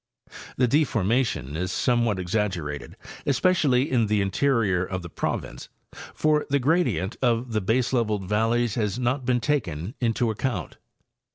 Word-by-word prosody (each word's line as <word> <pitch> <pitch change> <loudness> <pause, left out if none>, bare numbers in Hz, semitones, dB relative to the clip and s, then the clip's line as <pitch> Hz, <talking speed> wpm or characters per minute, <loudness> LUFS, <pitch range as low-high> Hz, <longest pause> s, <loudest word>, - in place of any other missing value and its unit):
The 125 - +3
deformation 115 - +1
is 90 +3 -2
somewhat 120 -2 +1
exaggerated, 90 - -3 0.3
especially 140 -2 +2
in 120 -4 +2
the 105 0 +1
interior 100 -2 +1
of 95 -1 -4
the 85 - -9
province, - - -4 0.5
for 150 -1 +1
the 140 - +3
gradient 140 - +1
of 120 -1 +1
the 110 -1 0
baseleveled 110 -1 0
valleys 115 +2 +1
has 105 -3 -1
not 125 +2 -1
been 125 -1 +3
taken 105 - -2
into 115 -1 +1
account. 120 +4 -3
115 Hz, 130 wpm, -25 LUFS, 95-130 Hz, 0.5 s, The